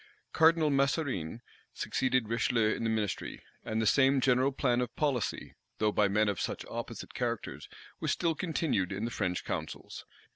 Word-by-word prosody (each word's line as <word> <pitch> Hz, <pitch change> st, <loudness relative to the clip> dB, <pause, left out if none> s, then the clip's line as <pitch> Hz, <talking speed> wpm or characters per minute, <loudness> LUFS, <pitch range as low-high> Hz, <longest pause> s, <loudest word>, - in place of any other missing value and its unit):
Cardinal 160 Hz, -1 st, +5 dB
Mazarine 135 Hz, -, 0 dB, 0.3 s
succeeded 130 Hz, -3 st, 0 dB
Richelieu 115 Hz, -1 st, +2 dB
in -, -, -4 dB
the 115 Hz, -, +1 dB
ministry; 110 Hz, -4 st, -2 dB, 0.2 s
and 110 Hz, -, -2 dB
the 110 Hz, -, +1 dB
same 135 Hz, +4 st, +4 dB
general 130 Hz, +1 st, +3 dB
plan 125 Hz, -2 st, +1 dB
of 120 Hz, -1 st, -4 dB
policy, 140 Hz, -7 st, -1 dB, 0.2 s
though 110 Hz, 0 st, +2 dB
by 105 Hz, 0 st, +3 dB
men 105 Hz, +2 st, +2 dB
of 100 Hz, -3 st, -1 dB
such -, -, -3 dB
opposite -, -, -6 dB
characters, -, -, -3 dB, 0.3 s
was -, -, -2 dB
still 170 Hz, -2 st, +1 dB
continued 155 Hz, -, -1 dB
in 100 Hz, +3 st, -2 dB
the 120 Hz, -, -3 dB
French 90 Hz, -5 st, -2 dB
councils. -, -, -5 dB
120 Hz, 160 wpm, -31 LUFS, 105-140 Hz, 0.3 s, Cardinal